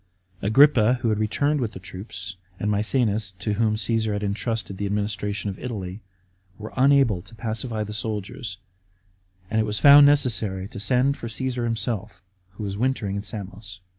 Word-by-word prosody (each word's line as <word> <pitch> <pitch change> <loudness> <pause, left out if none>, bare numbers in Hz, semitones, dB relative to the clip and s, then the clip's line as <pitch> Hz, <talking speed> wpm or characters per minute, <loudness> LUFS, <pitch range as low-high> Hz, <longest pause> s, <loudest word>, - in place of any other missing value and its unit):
Agrippa, 125 +1 +5
who 115 - +2
had 110 -1 0
returned 145 +7 +1
with 115 -3 -2
the - - -8
troops, 95 -1 -7 0.2
and 105 - 0
Maecenas, 105 -2 +1
to 100 +3 -3
whom 110 +1 +1
Caasar 110 -1 0
had 105 0 -2
entrusted 105 0 -2
the 100 +1 -2
administration 105 0 -2
of 95 - -10
Italy, 100 -5 -5 0.6
were 110 0 -8
unable 135 -8 +4
to 100 +5 -15
pacify 110 0 -3
the 105 0 -6
soldiers, 105 -2 -4 0.9
and 110 0 +2
it - - 0
was 105 0 0
found 145 +2 +9
necessary 110 -9 +1
to - - -8
send 125 +7 +2
for 115 - -6
Csesar 125 +1 -2
himself, 115 -4 -3 0.3
who 100 - -7
was 100 -1 -4
wintering 120 -5 -1
in 100 - -2
Samos. 100 -2 -6
110 Hz, 165 wpm, -24 LUFS, 100-120 Hz, 0.9 s, found